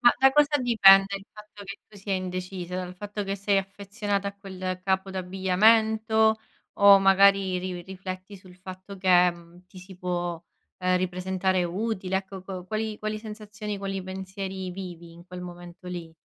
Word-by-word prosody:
Ma 240 - +7
da 265 +1 +5
cosa 295 0 +4
dipende 200 -5 +6
il 195 - -11
fatto 210 -1 -13
che 200 0 -8
tu 215 - -16
sia 195 0 -3
indecisa? 185 -1 -5
Dal 180 -1 -5
fatto 205 +2 -5
che 195 0 -3
sei 200 0 +1
affezionata 200 +1 -3
a 200 - -10
quel 185 -2 -5
capo 190 0 0
d'abbigliamento, 220 +4 +3 0.4
o 200 -1 +8
magari 195 -1 +4
ri 180 -1 -5
rifletti 185 +1 -8
sul 185 -1 -16
fatto 185 +2 -10
che, 180 -1 +5
mhmm, 170 +1 -16
ti 185 - -14
si 190 +1 -12
può, 175 -2 -3 0.4
ehm, 185 0 +2
ripresentare 185 0 0
utile? 190 +1 -2
Ecco, 190 0 -6
co 185 -1 -7
qual 215 +2 -3
quali 215 0 -3
sensazioni, 210 -1 -7
quali 195 -1 -4
pensieri 190 0 -6
vivi 175 -3 -8
in 170 +1 -15
quel 180 0 -8
momento 175 0 -11
lì? 175 -2 -6
190 Hz, 165 wpm, -26 LUFS, 185-200 Hz, 0.4 s, o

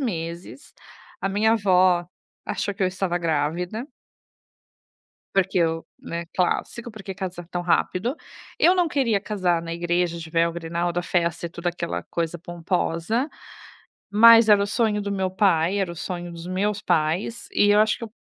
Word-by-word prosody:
meses. 170 - -5 0.5
A - - -1
minha 220 +3 +3
vó 185 -4 +3 0.4
achou 205 - -2
que 195 - -3
eu - - +4
estava 185 -1 -2
grávida. 170 - -1 1.5
Porque 190 -1 +2
eu, 165 -1 +1
né, 170 0 -5
clássico, 230 +6 -1
"Por 215 -3 -11
que 195 - -5
casar 185 -2 -6
tão 175 - -3
rápido?". 185 - 0 0.4
Eu 355 - +5
não 360 -2 +2
queria 255 -9 +1
casar 185 -5 0
na 165 0 -5
igreja 175 0 0
de 165 -1 -8
véu, 165 +1 +2
grinalda, 170 +1 -2
festa 170 -1 -1
e - - -15
toda 170 +1 -5
aquela 175 -1 -3
coisa 170 0 -3
pomposa, 175 - -1 0.8
mas 230 +2 +8
era 205 -1 +6
o 200 - +1
sonho 215 -1 +1
do 200 0 -3
meu 190 -1 -1
pai, 190 -2 +2
era 190 -3 -1
o - - -8
sonho 175 0 -5
dos 170 +1 -8
meus 205 +3 -1
pais, 165 +9 0
e 205 - +4
eu 205 - +5
acho 215 0 +3
que - - -18
eu 225 - -9
180 Hz, 170 wpm, -24 LUFS, 170-205 Hz, 1.5 s, mas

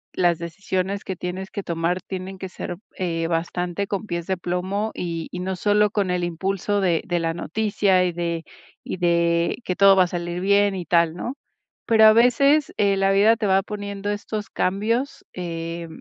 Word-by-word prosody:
las 175 -2 +3
decisiones 185 +3 -3
que 190 - -3
tienes 180 +2 -5
que 200 - -5
tomar 170 +2 -1
tienen 190 +1 -6
que 190 0 -6
ser, 175 - -6 0.2
eh, 165 -3 -1
bastante 175 +3 -2
con 200 +1 -3
pies 170 -3 -4
de 190 - +1
plomo 185 +5 -2
y 165 -2 -4
y 180 - -5
no 185 +1 -2
solo 210 +1 +2
con 200 -3 0
el 180 -1 0
impulso 195 +4 -1
de 175 -4 +1
de 175 -3 0
la 165 0 -1
noticia 200 +1 +1
y 180 - +1
de 170 -1 -3 0.4
y - - -5
de 170 -1 +2
que 180 - -2
todo 195 -1 +7
va 185 - +6
a - - -4
salir 175 0 -4
bien 200 +1 +3
y 180 -2 -5
tal, 170 -2 +3
¿no?, 240 +9 -4 0.5
pero 220 -1 +6
a 215 - +9
veces, 275 +6 +4
eh, 200 -1 +2
la 195 0 +3
vida 210 +3 +5
te 220 -2 -3
va 190 0 +4
poniendo 205 0 -5
estos 205 0 -4
cambios, 225 +8 -1
eh, 170 -1 -5
185 Hz, 190 wpm, -23 LUFS, 175-205 Hz, 0.5 s, a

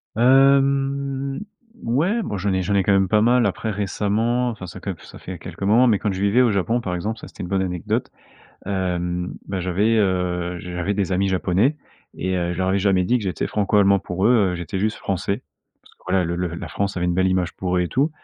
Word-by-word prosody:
Hem, 135 +2 +3 0.4
ouais, 165 - +1
bon, 105 - -3
j'en 95 +1 -1
ai 95 - +1
j'en 100 +3 0
ai 100 - +3
quand 100 - +2
même 95 -1 +3
pas 105 +2 +3
mal. 120 0 +4
Après 110 +3 -3
récemment, 110 +5 0
enfin 95 -6 -7
ça 90 - -9
que 100 - -4
ça - - -12
fait 90 -2 -8
quelques 90 +2 -10
moments. 115 +5 +5
Mais 110 - +4
quand 105 +1 -1
je 95 0 -4
vivais 100 +5 +4
au 120 -3 +4
Japon, 110 +5 0
par 90 -5 -3
exemple, 105 +6 -3
ça, - - -9
c'était - - -11
une 90 - -6
bonne 95 -1 +1
anecdote, 90 -2 -2 0.6
hem, 90 -2 -2
bah 95 -2 -3
j'avais, 100 +6 +1
heu, 90 -3 0
j 90 - -8
j'avais 90 +3 -1
des 95 -2 -1
amis 95 +1 +1
Japonais 95 - +1 0.4
et 95 0 -1
heu, 90 -1 -1
je 85 - -6
leur 95 0 0
avais 95 - +2
jamais 95 -2 +2
dit 125 +6 +2
que 110 - -3
j'étais 90 -5 -2
Franco-Allemand. 100 -1 +3
Pour 95 +2 -1
eux, 110 -6 +4
heu, - - -3
j'étais 85 +2 -4
juste 105 +2 -1
Français. 100 +4 -2 0.4
Parce - - -22
que - - -42
voilà, 90 -1 +2
le 85 +1 -2
le 90 0 -1
la - - -6
France 100 -1 -2
avait 90 - 0
une 90 - 0
belle 95 +1 +2
image 90 -2 0
pour 90 -1 -2
eux - - +2
et 90 - -1
tout 140 +5 +1
100 Hz, 240 wpm, -22 LUFS, 90-115 Hz, 0.6 s, moments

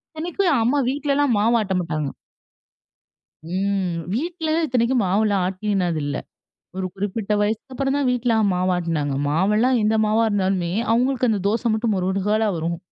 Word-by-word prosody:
இத்தனைக்கும் 350 +3 0
அம்மா 265 +5 +2
வீட்லல்லாம் 285 -2 +1
மாவு 230 +3 +3
ஆட்ட 190 -3 -2
மாட்டாங்க. 155 -4 -3 1.4
ம். 190 -2 0 0.2
வீட்லல 320 - -1
இத்தனைக்கும் 245 0 +1
மாவுல்லாம் 200 0 +1
ஆட்டினது 185 -3 -1
இல்ல. 145 0 -2 0.6
ஒரு 190 - -2
குறிப்பிட்ட 205 +2 -2
வயசுக்கு 220 +5 -2
அப்புறம் 270 +1 -1
தான் 285 -2 +1
வீட்ல 245 -2 +1 0.2
மாவு 180 +1 +1
ஆட்டுனாங்க. 160 -5 -1
மாவுல்லாம் 210 - +2
எந்த 215 +1 +2
மாவா 215 +2 +2
இருந்தாலும்மே, 190 -4 0 0.2
அவுங்களுக்கு 250 +1 +1
அந்த 205 -3 -1
தோச 230 +2 0
மட்டும் 220 0 0
மொறுகலா 195 +4 0
வரும். 170 +1 -2
210 Hz, 140 wpm, -22 LUFS, 185-250 Hz, 1.4 s, மாவு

